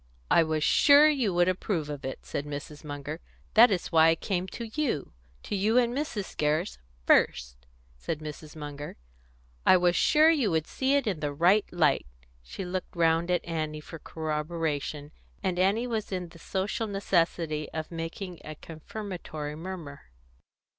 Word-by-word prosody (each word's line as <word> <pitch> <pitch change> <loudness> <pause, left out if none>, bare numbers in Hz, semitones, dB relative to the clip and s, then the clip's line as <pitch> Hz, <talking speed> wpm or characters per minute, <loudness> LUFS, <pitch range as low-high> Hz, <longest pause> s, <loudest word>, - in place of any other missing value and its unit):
"I - - +7
was 155 -1 0
sure 290 - +7
you 265 -9 +1
would 175 0 +4
approve 185 -3 -1
of 145 -2 -6
it," 130 - -6
said 140 - -3
Mrs. 145 +1 -7
Munger. 145 +1 -6 0.3
"That 230 +3 +8
is 190 -4 -2
why 160 -1 +6
I 165 - +5
came 185 +1 -2
to 235 - -6
you 265 - -1 0.3
to - - -3
you 210 +5 +2
and 240 -1 +3
Mrs. 255 -9 -4
Gerrish 150 - 0 0.3
first," - - +3 0.4
said 70 - -3
Mrs. 155 0 -9
Munger. 145 -1 -7 0.7
"I 185 - +7
was 175 0 +2
sure 310 - +5
you 275 -10 +2
would 160 -2 0
see 270 +1 0
it 280 -2 +2
in 195 -7 -1
the 145 -1 -2
right 175 +8 +4
light." 165 - +2 0.3
She 65 - -7
looked 185 0 -4
round 165 0 +2
at 180 -1 +1
Annie 155 -2 -3
for 160 +2 -10
corroboration, 150 -2 -3 0.3
and 185 -2 -1
Annie 200 +6 +2
was 225 -4 -3
in 180 -2 -3
the 165 - -15
social 195 +6 -2
necessity 170 -6 0
of 160 +1 -5
making 165 +2 -6
a 155 - -7
confirmatory 160 -2 -7
murmur. 160 - -8
165 Hz, 165 wpm, -28 LUFS, 150-195 Hz, 0.7 s, That